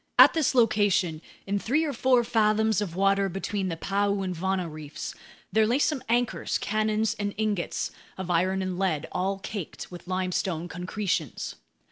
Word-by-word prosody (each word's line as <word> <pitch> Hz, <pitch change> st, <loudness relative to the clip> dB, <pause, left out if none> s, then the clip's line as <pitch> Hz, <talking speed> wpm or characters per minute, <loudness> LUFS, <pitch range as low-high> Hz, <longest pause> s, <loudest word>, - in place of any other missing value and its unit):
At -, -, +9 dB
this 315 Hz, -5 st, +1 dB
location, 205 Hz, -8 st, +3 dB, 0.2 s
in 200 Hz, +1 st, 0 dB
three 295 Hz, +10 st, +1 dB
or 290 Hz, -, -2 dB
four 255 Hz, -2 st, +3 dB
fathoms 220 Hz, -2 st, +2 dB
of 180 Hz, -5 st, -3 dB
water 195 Hz, +1 st, +3 dB
between 195 Hz, +1 st, -2 dB
the 165 Hz, -, -3 dB
Paeu 200 Hz, +2 st, 0 dB
and 185 Hz, -1 st, -3 dB
Vana 185 Hz, +1 st, -1 dB
reefs, 155 Hz, -2 st, -7 dB, 0.4 s
there 220 Hz, 0 st, +4 dB
lay 240 Hz, +4 st, +3 dB
some 295 Hz, -1 st, +1 dB
anchors, 240 Hz, +1 st, +1 dB
cannons, 215 Hz, +1 st, 0 dB
and 205 Hz, -1 st, -2 dB
ingots 210 Hz, -5 st, -1 dB, 0.3 s
of 185 Hz, -1 st, -3 dB
iron 185 Hz, +3 st, +2 dB
and 185 Hz, -1 st, -3 dB
lead, 165 Hz, -6 st, 0 dB
all 195 Hz, +2 st, -1 dB
caked 195 Hz, -3 st, -6 dB
with 175 Hz, 0 st, -10 dB
limestone 185 Hz, -2 st, -1 dB
concretions. 180 Hz, -, -3 dB
195 Hz, 160 wpm, -27 LUFS, 180-215 Hz, 0.4 s, At